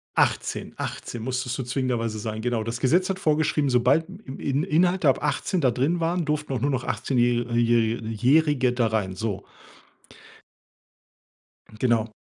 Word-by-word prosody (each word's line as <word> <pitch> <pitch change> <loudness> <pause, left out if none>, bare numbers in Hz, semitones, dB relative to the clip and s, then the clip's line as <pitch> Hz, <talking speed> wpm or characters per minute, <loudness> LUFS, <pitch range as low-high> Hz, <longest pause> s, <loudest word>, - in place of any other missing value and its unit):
18, - - 0
18 120 -2 -5
musstest 125 0 -2
du 130 - -3
zwingenderweise 120 -4 -2
sein, 110 0 -4
genau. 120 -2 -1
Das 115 +1 -4
Gesetz 175 +9 +2
hat 190 - -2
vorgeschrieben, 150 -4 +1
sobald 125 +6 +3 0.2
im 130 - -8
In 140 +2 0
Inhalte 175 -2 +2
ab - - +1
18 185 -4 0
da 130 -4 +3
drin 145 +9 0
waren, 170 +1 0
durften 150 -2 -2
auch 125 - -2
nur 140 - +1
noch 130 -3 -1
achtzehnjäh 120 -2 +1
äh, 115 - -1
jähri 115 -1 +2
Jährige 130 +2 +3
da 120 -2 +1
rein, 105 -4 -1
so. 100 -1 -3 2.4
Genau. 115 -3 +1
125 Hz, 155 wpm, -25 LUFS, 115-150 Hz, 2.4 s, sobald